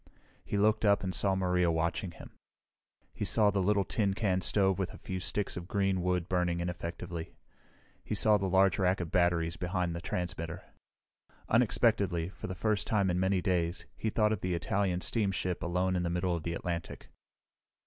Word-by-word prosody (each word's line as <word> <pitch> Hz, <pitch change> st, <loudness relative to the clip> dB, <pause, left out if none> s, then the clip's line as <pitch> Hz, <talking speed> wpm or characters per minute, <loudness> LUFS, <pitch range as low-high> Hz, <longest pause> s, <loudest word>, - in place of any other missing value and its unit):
He 100 Hz, -, -2 dB
looked 110 Hz, +2 st, +3 dB
up 100 Hz, -2 st, +4 dB
and 95 Hz, -1 st, -2 dB
saw 95 Hz, 0 st, +1 dB
Maria 90 Hz, -2 st, +2 dB
watching 85 Hz, +3 st, -1 dB
him. -, -, -12 dB, 0.8 s
He -, -, -4 dB
saw 105 Hz, +1 st, +3 dB
the 100 Hz, -1 st, 0 dB
little 100 Hz, +1 st, +2 dB
tin 100 Hz, 0 st, 0 dB
can 95 Hz, -4 st, +1 dB
stove 95 Hz, 0 st, +2 dB
with 95 Hz, -, -1 dB
a -, -, -10 dB
few 95 Hz, 0 st, -5 dB
sticks 100 Hz, +2 st, -2 dB
of 85 Hz, -1 st, -6 dB
green 95 Hz, -2 st, +1 dB
wood 90 Hz, -1 st, 0 dB
burning 90 Hz, -2 st, 0 dB
ineffectively. 85 Hz, -1 st, -5 dB, 0.7 s
He -, -, -3 dB
saw 105 Hz, -1 st, +4 dB
the 95 Hz, 0 st, -1 dB
large 95 Hz, -1 st, +4 dB
rack 95 Hz, 0 st, +2 dB
of 85 Hz, -3 st, -4 dB
batteries 85 Hz, -2 st, +2 dB
behind 90 Hz, -1 st, -1 dB
the 85 Hz, -, -5 dB
transmitter. 85 Hz, -1 st, -4 dB, 0.9 s
Unexpectedly, 105 Hz, -7 st, +2 dB
for -, -, -8 dB
the 95 Hz, -, -5 dB
first 105 Hz, +3 st, 0 dB
time 100 Hz, -4 st, +2 dB
in 90 Hz, -, 0 dB
many 95 Hz, -1 st, +1 dB
days, 85 Hz, -1 st, 0 dB
he 110 Hz, -, -2 dB
thought 105 Hz, 0 st, +2 dB
of 105 Hz, -, -4 dB
the 90 Hz, -1 st, -1 dB
Italian 90 Hz, +1 st, 0 dB
steamship 95 Hz, -5 st, -1 dB
alone 90 Hz, +2 st, 0 dB
in 90 Hz, -, +1 dB
the 85 Hz, -, -1 dB
middle 90 Hz, +1 st, 0 dB
of 85 Hz, -, -4 dB
the 85 Hz, +1 st, -3 dB
Atlantic. 85 Hz, -1 st, -5 dB
90 Hz, 185 wpm, -31 LUFS, 85-100 Hz, 0.9 s, up